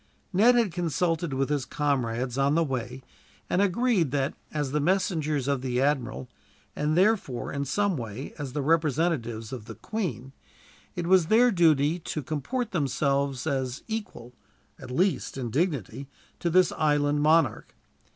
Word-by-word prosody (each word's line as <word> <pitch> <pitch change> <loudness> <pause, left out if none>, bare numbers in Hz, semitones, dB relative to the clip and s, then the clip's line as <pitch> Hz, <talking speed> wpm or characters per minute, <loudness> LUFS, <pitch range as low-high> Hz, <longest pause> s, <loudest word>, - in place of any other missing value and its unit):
Ned 230 +7 +5
had 230 -6 +2
consulted 170 -1 -1
with 135 +1 -1
his 145 -3 0
comrades 125 -4 -1
on 140 +2 +2
the 165 - +3
way, 130 -2 -4 0.4
and 180 - +1
had 200 - +3
agreed 205 - +1
that, 135 0 -1 0.2
as 145 -3 -2
the 150 - +1
messengers 155 - 0
of 140 -2 0
the 125 -1 -1
admiral, 135 -3 0 0.5
and 150 +2 0
therefore 190 - +1
in 140 0 -2
some 200 +7 0
way 115 +2 -6
as 135 -4 -5
the 145 - -2
representatives 150 -7 0
of 120 -5 -7
the - - -9
Queen, 170 - -4 0.6
it 175 - -3
was 180 -2 +4
their 240 +5 +5
duty 160 -3 +3
to 155 -2 -5
comport 205 - -3
themselves 140 -4 0
as 135 -3 -2
equal, 205 - -6 0.5
at - - -10
least, 175 +3 0
in 120 -4 -4
dignity 140 - -2 0.3
to 170 - 0
this 185 +1 +4
island 145 -1 +1
monarch. 160 +2 +2
150 Hz, 155 wpm, -27 LUFS, 135-175 Hz, 0.6 s, Ned